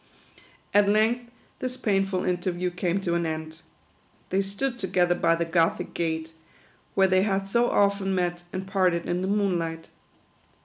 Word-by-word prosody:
At 205 0 +5
length 225 +3 +2 0.3
this 255 0 -3
painful 195 -5 0
interview 180 0 -1
came 180 +1 -1
to 175 -3 -1
an 170 -1 0
end. 160 0 -5 0.7
They 190 +1 +2
stood 235 +6 -3
together 180 -2 +2
by 165 -1 +2
the 170 0 -1
Gothic 165 0 +1
gate, 160 -1 -2 0.6
where 195 - +5
they 185 0 +3
had 195 -1 0
so 235 +5 +2
often 200 -1 +2
met 175 -1 -1
and 185 +1 -4
parted 185 -3 +1
in 175 +1 -1
the 185 - -1
moonlight. 175 -5 -1
185 Hz, 150 wpm, -26 LUFS, 170-200 Hz, 0.7 s, At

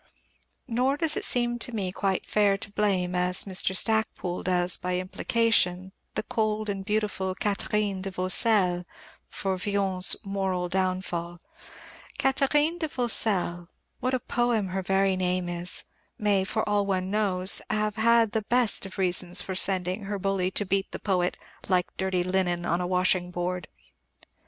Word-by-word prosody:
Nor 255 +4 0
does 315 -1 +1
it - - -3
seem 240 -1 -1
to, 245 - -1
me 195 -4 -2
quite 190 0 -1
fair 205 -2 +2
to 200 - -6
blame, 195 -4 0
as 180 0 +2
Mr. 190 -1 +2
Stacpoole 220 -5 0
does 180 -1 +3
by 180 0 -2
implication, 185 -1 0 0.2
the - - -1
cold 215 -1 -1
and 195 -1 -3
beautiful 205 -2 -2
Katherine 205 -2 -1
de 195 - -4
Vaucelles 185 0 +2 0.5
for 190 -1 -3
Villon's 195 -2 +1
moral 190 -3 -2
downfall. 185 -2 -2 0.8
Katherine 295 +5 +1
de 320 - -1
Vaucelles 205 - +2 0.3
what 255 +1 0
a - - -1
poem 235 -5 0
her 190 +1 -2
very 195 0 +1
name 180 -1 -1
is! 175 0 -1 0.3
may, 205 -2 +2
for 215 +3 -2
all 205 -1 +1
one 190 -1 -1
knows, 195 -3 +3
have 215 0 -1
had 230 0 +4
the 220 - 0
best 240 -5 +2
of 190 - -12
reasons 180 -1 +3
for 190 - -5
sending 185 +1 +2
her 200 +1 -3
bully 195 -1 -1
to 205 +2 -1
beat 195 +1 -1
the - - -4
poet 180 -3 -1 0.3
"like 180 -2 0
dirty 190 -2 0
linen 180 -1 0
on 170 0 0
the 180 - -2
washing 180 0 +1
board." 180 0 -4
190 Hz, 155 wpm, -26 LUFS, 180-215 Hz, 0.8 s, had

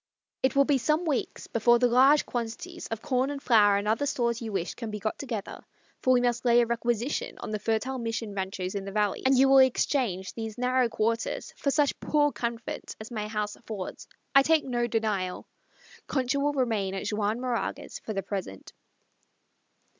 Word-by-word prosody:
It 260 - +1
will 275 0 +5
be 280 -2 +2
some 305 +8 +1
weeks 290 -6 -2
before 240 +1 +3
the 245 - +2
large 265 +5 +5
quantities 230 -2 -5
of 225 -1 -5
corn 265 -2 +1
and 285 -1 -4
flour 210 -7 +5
and 200 +1 -2
other 225 +7 +1
stores 235 -3 0
you 225 -2 -4
wish 190 -3 -2
can 230 -2 -6
be 210 - -4
got 215 +1 -3
together 235 -7 -5 0.4
for 255 - +3
we 250 -1 +5
must 240 -1 0
lay 240 -1 +5
a 240 - +4
requisition 235 +2 -2
on - - -6
the 215 - -2
fertile 225 +5 -1
Mission 225 -2 -3
ranchos 190 -1 -3
in 200 -1 -3
the 195 - -5
valleys 210 -1 0
and 265 0 +4
you 270 +1 +6
will 270 0 +7
exchange 245 -7 +1
these 220 -2 -6
narrow 250 0 +2
quarters 230 +1 -2
for 280 - -1
such 290 0 +1
poor 295 -1 +2
comfort 235 0 -5
as 220 +2 -9
my 210 -2 -3
house 210 -1 -3
affords 215 -5 -7 0.3
I 275 - +8
take 315 +2 +3
no 240 -2 0
denial. 210 -5 -1 0.6
Concha 265 0 0
will 290 +1 +1
remain 220 -8 0
at 195 - -4
Juan 210 +1 -1
Moraga's 250 -2 -3
for 215 - -6
the 195 -1 -2
present." 185 - -6
235 Hz, 190 wpm, -28 LUFS, 210-260 Hz, 0.6 s, I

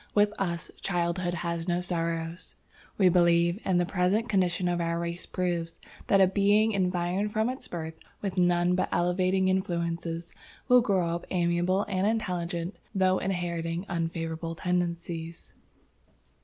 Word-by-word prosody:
With 205 0 +4
us, 170 -3 -2
childhood 175 -1 -1
has 170 0 -3
no 175 0 +1
sorrows. 165 -1 -3 0.4
We 190 - +5
believe, 170 +1 +4
and 185 -2 +2
the 175 - +2
present 195 +5 +1
condition 185 -3 +1
of 175 -1 0
our 170 0 0
race 170 +1 -4
proves, 170 -2 -2 0.3
that 195 - +4
a 190 - +8
being 205 +3 +3
environed 185 +1 0
from 220 +3 +1
its 260 - -6
birth 160 -2 -5 0.3
with 195 -3 -3
none 175 -1 +3
but 185 - 0
elevating 185 +2 +2
influences, 170 -2 -2 0.3
will 250 -1 +7
grow 190 -7 +1
up 170 +1 -4
amiable 175 +2 +1
and 195 0 0
intelligent 180 -5 -2 0.2
though 185 -1 +3
inheriting 175 -2 -2
unfavorable 165 -1 -3
tendencies. 170 -2 -3
175 Hz, 140 wpm, -28 LUFS, 170-190 Hz, 0.4 s, a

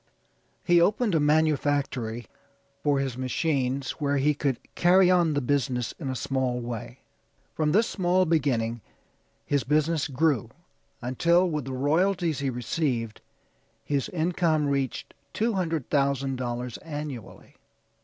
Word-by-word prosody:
He 175 -1 +4
opened 210 +3 +2
a 160 - +3
manufactory 145 -6 +1 0.6
for 145 -1 +2
his 130 -2 -3
machines 135 -2 -1
where 145 -1 +1
he 145 +2 +3
could 140 -3 -1 0.2
carry 180 +1 +5
on 170 -4 +3
the 145 - +1
business 125 -2 0
in 140 -5 -4
a 130 - -2
small 130 -1 -1
way. 120 +1 -6 0.5
From 155 -1 0
this 215 +6 +4
small 185 -1 +1
beginning 125 -8 0 0.6
his 140 -3 +1
business 155 +3 +1
grew 140 -4 +1 0.5
until, 170 +9 +3
with 150 -6 -2
the 135 - -5
royalties 165 +3 +1
he 140 -1 -1
received, 120 -1 -2 0.6
his 140 -2 -1
income 165 -2 +1
reached 135 -2 -2 0.2
$200,000 140 - -1
annually. 145 -7 -8
145 Hz, 120 wpm, -26 LUFS, 130-165 Hz, 0.6 s, carry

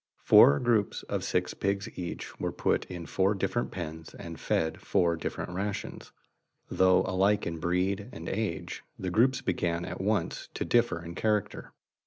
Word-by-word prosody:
Four 70 - +8
groups 115 -5 +1
of - - -3
six - - 0
pigs 100 0 -1
each 90 -1 -6
were - - -1
put - - 0
in 90 -2 -7
four 95 +4 +1
different 120 +5 -1
pens 80 -3 -7
and 85 -1 -8
fed 80 0 -1
four 85 -2 +2
different 85 - -4
rations. 100 +3 -4 0.6
Though 95 0 +4
alike 95 +3 +2
in 85 -1 -4
breed 95 +5 0
and 85 -7 -8
age; 105 -3 -3
the 95 -1 -3
groups 125 +7 +3
began 85 0 -1
at - - -5
once 105 +2 -1
to - - -2
differ 115 -8 +2
in 85 - -6
character. 105 +1 -1
95 Hz, 160 wpm, -29 LUFS, 85-105 Hz, 0.6 s, Four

